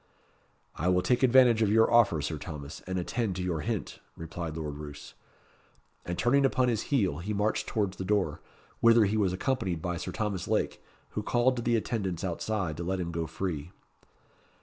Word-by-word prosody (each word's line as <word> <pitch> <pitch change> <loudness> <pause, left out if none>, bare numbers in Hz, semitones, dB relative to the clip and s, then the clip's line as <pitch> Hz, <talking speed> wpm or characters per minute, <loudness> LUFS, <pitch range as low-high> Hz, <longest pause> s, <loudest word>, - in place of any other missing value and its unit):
"I 85 - -2
will 90 0 +3
take 120 +7 +2
advantage 125 -3 +6
of 105 -2 +3
your 115 +2 +4
offer, 105 -11 +4
Sir 75 +1 -3
Thomas, 75 -3 -7
and 95 0 -2
attend 100 +2 -1
to 90 - -3
your 85 -3 -1
hint," 75 - -3 0.2
replied 80 -1 -5
Lord 75 -3 -4
Roos. 75 -4 -9 0.9
And 85 0 -3
turning 135 +4 +3
upon 130 -1 +2
his 115 -2 -2
heel, 95 - +1
he 100 +5 -3
marched 110 +1 0
towards 100 -4 -1
the - - -4
door, 95 -6 0 0.4
whither 115 -1 +6
he 100 +2 0
was 100 -4 +2
accompanied 95 - -1
by 90 +2 -3
Sir 90 +2 -5
Thomas 100 -2 -3
Lake, - - 0 0.3
who 105 - -3
called 120 +4 +2
to - - -1
the 120 0 +1
attendants 100 -6 -2
outside 90 -2 -2
to 85 - -4
let 95 +2 -1
him 85 -1 -3
go 85 -1 -2
free. 80 -2 -4
95 Hz, 190 wpm, -29 LUFS, 85-110 Hz, 0.9 s, advantage